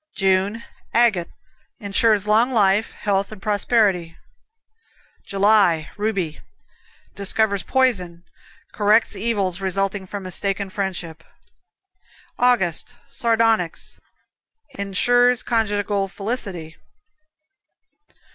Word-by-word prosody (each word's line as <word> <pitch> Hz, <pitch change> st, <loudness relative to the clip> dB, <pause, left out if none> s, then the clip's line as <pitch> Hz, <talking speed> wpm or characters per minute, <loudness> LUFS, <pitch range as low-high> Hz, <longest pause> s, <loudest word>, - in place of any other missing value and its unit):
June, 195 Hz, +3 st, 0 dB, 0.3 s
Agate 220 Hz, -8 st, +2 dB, 0.5 s
Insures 205 Hz, +1 st, +2 dB
long 220 Hz, +4 st, +3 dB
life, 210 Hz, -3 st, +2 dB
health 200 Hz, 0 st, -1 dB
and 215 Hz, -, -10 dB
prosperity. 205 Hz, -5 st, 0 dB, 1.1 s
July, 195 Hz, -5 st, +2 dB
Ruby 195 Hz, -7 st, -2 dB, 0.8 s
Discovers 200 Hz, 0 st, +1 dB
poison; 185 Hz, -10 st, 0 dB, 0.5 s
corrects 215 Hz, +1 st, +2 dB
evils 195 Hz, -3 st, -1 dB
resulting 195 Hz, 0 st, -2 dB
from 200 Hz, +1 st, -6 dB
mistaken 195 Hz, +1 st, -1 dB
friendship. 180 Hz, -5 st, -4 dB, 1.2 s
August, 245 Hz, -2 st, +1 dB
Sardonyx 225 Hz, -6 st, 0 dB, 0.8 s
Insures 245 Hz, +5 st, +2 dB
conjugal 205 Hz, -3 st, -1 dB
felicity. 195 Hz, -6 st, -5 dB
200 Hz, 75 wpm, -21 LUFS, 190-225 Hz, 1.2 s, long